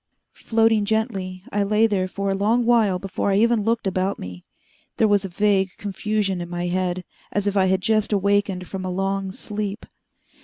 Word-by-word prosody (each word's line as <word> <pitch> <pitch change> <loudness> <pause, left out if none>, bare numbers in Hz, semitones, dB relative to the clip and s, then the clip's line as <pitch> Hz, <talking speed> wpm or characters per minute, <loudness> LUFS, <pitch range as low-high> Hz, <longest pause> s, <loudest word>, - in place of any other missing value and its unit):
Floating 225 -1 +2
gently, 200 -4 -2
I 205 - 0
lay 210 +2 +3
there 195 -4 +1
for 200 +1 -2
a - - +1
long 220 +5 +2
while 225 -6 +3
before 195 +2 -2
I 195 - +2
even 230 +1 +3
looked 225 +1 0
about 190 +1 0
me. 90 -1 -8 0.5
There 220 - +4
was 205 -1 +2
a - - -4
vague 195 +1 +2
confusion 205 -2 -2
in 175 - -6
my 175 0 -3
head, 180 0 -1 0.3
as 205 -1 -1
if 205 0 0
I 190 -1 +4
had 190 0 +2
just 215 +1 +1
awakened 200 -2 +1
from 190 -1 -5
a 185 - -3
long 195 +1 -1
sleep. 210 +1 -5
200 Hz, 190 wpm, -23 LUFS, 185-215 Hz, 0.5 s, There